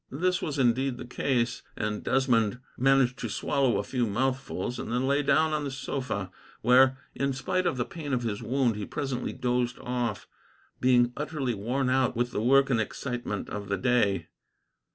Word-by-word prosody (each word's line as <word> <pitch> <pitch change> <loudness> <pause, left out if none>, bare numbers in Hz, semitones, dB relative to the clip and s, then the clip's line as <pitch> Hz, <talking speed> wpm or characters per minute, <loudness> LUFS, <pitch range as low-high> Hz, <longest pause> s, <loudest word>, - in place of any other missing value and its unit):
This 180 +7 0
was 150 -1 -3
indeed 130 0 +2
the - - -7
case, 120 -1 0 0.2
and 105 0 -2
Desmond 120 -4 +2 0.2
managed 130 -1 +3
to 115 - -3
swallow 135 +3 +1
a - - -1
few 125 -3 -1
mouthfuls, 125 0 -2
and - - -5
then 125 +2 +1
lay 140 +2 +2
down 155 +3 +3
upon 150 -1 0
the 140 - -2
sofa, 130 -8 -4 0.3
where, 130 +2 +6 0.2
in 140 0 -1
spite 185 +7 -1
of 130 - 0
the 120 - 0
pain 155 -4 -6
of 125 -2 0
his 110 -2 -2
wound, 120 0 +1
he 105 - -4
presently 135 -4 -3
dozed 125 -1 -1
off, 120 -4 -3 0.5
being 125 -1 +4
utterly 145 -4 -2
worn 125 +6 -1
out 130 -1 +2
with 120 +1 0
the 105 - -2
work 135 +3 +4
and 115 -3 +3
excitement 120 -2 -4
of 100 -1 -5
the 100 - 0
day. 120 -6 +1
125 Hz, 180 wpm, -28 LUFS, 120-135 Hz, 0.5 s, where